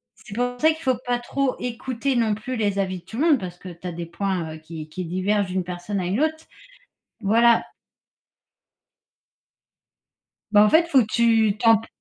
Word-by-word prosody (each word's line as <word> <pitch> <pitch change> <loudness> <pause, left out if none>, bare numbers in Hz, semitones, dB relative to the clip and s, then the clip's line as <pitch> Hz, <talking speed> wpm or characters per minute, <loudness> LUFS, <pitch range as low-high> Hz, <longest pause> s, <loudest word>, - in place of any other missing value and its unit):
c'est 220 -2 -12
pour 245 0 -2
ça 315 - +5
qu'il 320 - -7
faut 260 -2 +1
pas 245 0 0
trop 260 +2 -1
écouter 250 +2 -2
non 220 -3 +2
plus 255 +4 -5
les 205 -2 0
avis 185 -2 -1
de 175 - -24
tout 220 +5 -9
le 305 - +2
monde 290 -6 +4
parce 180 -1 -7
que 185 - -10
tu 175 +1 -9
as - - -3
des 170 0 -6
points, 170 -2 -3
heu, - - -9
qui 155 -1 -9
qui 180 +3 -5
divergent 190 +4 0
d'une 185 -1 -1
personne 180 +3 -4
à 180 - -2
une 195 +10 0
autre, 315 0 -1 0.8
voilà. 230 +3 +4 2.9
Bah, 210 0 +7
en 210 - +4
fait, 325 +6 +5
il - - -18
faut 270 -5 +5
que - - 0
tu 225 -3 +3
t'en 225 -1 +5
p 225 - -10
215 Hz, 205 wpm, -23 LUFS, 185-245 Hz, 2.9 s, Bah